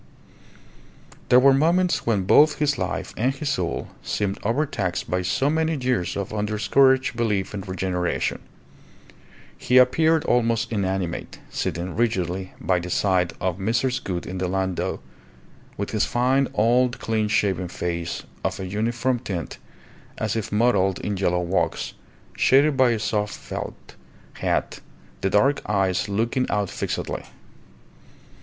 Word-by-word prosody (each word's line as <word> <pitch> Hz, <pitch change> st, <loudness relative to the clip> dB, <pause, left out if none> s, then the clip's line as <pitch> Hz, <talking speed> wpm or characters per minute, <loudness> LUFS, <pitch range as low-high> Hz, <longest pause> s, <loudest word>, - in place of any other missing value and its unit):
There 125 Hz, -, +7 dB
were 135 Hz, +1 st, +6 dB
moments 170 Hz, +5 st, +2 dB
when 105 Hz, -5 st, +2 dB
both 150 Hz, +10 st, +5 dB
his 145 Hz, -3 st, 0 dB
life 95 Hz, 0 st, -3 dB
and 125 Hz, +4 st, +1 dB
his 145 Hz, +1 st, -3 dB
soul 90 Hz, -9 st, -2 dB
seemed 100 Hz, -2 st, -2 dB
overtaxed 115 Hz, -, -1 dB
by 90 Hz, 0 st, +1 dB
so 135 Hz, +9 st, 0 dB
many 160 Hz, +1 st, +1 dB
years 125 Hz, -10 st, -1 dB
of 100 Hz, +1 st, -4 dB
undiscouraged 115 Hz, +6 st, +2 dB
belief 105 Hz, -5 st, -1 dB
in 100 Hz, -, -4 dB
regeneration. 95 Hz, -2 st, -2 dB, 1.2 s
He 125 Hz, -, +2 dB
appeared 155 Hz, +6 st, +4 dB
almost 115 Hz, -4 st, +1 dB
inanimate, 95 Hz, -4 st, -2 dB
sitting 90 Hz, +2 st, -3 dB
rigidly 95 Hz, -5 st, -1 dB
by 90 Hz, -1 st, +1 dB
the 90 Hz, +1 st, -6 dB
side 90 Hz, -1 st, +1 dB
of 95 Hz, 0 st, -2 dB
Mrs. 120 Hz, +6 st, 0 dB
Gould 90 Hz, -2 st, -3 dB
in 95 Hz, +1 st, -5 dB
the 90 Hz, -, -1 dB
landau, 95 Hz, 0 st, -1 dB, 0.8 s
with 100 Hz, -, -3 dB
his 110 Hz, -, +1 dB
fine, 130 Hz, +3 st, +2 dB
old, 120 Hz, +3 st, +3 dB
clean 110 Hz, -1 st, 0 dB
shaven 95 Hz, -4 st, +1 dB
face 85 Hz, -1 st, -4 dB, 0.2 s
of -, -, -2 dB
a 95 Hz, -, -4 dB
uniform 120 Hz, +6 st, -1 dB
tint 95 Hz, -9 st, -5 dB, 0.6 s
as 110 Hz, 0 st, -1 dB
if 110 Hz, -1 st, -3 dB
modelled 105 Hz, -4 st, +2 dB
in 105 Hz, -, -2 dB
yellow 90 Hz, -2 st, +1 dB
wax, 90 Hz, +2 st, -1 dB, 0.4 s
shaded 140 Hz, +2 st, +4 dB
by 130 Hz, -2 st, +4 dB
a 115 Hz, -, +1 dB
soft 105 Hz, -1 st, -1 dB
felt -, -, -7 dB, 0.4 s
hat, -, -, -1 dB, 0.4 s
the 95 Hz, -, +1 dB
dark 135 Hz, +9 st, +3 dB
eyes 95 Hz, -1 st, +1 dB
looking 115 Hz, +5 st, 0 dB
out 105 Hz, -2 st, -1 dB
fixedly. -, -, -3 dB
105 Hz, 135 wpm, -24 LUFS, 95-125 Hz, 1.2 s, There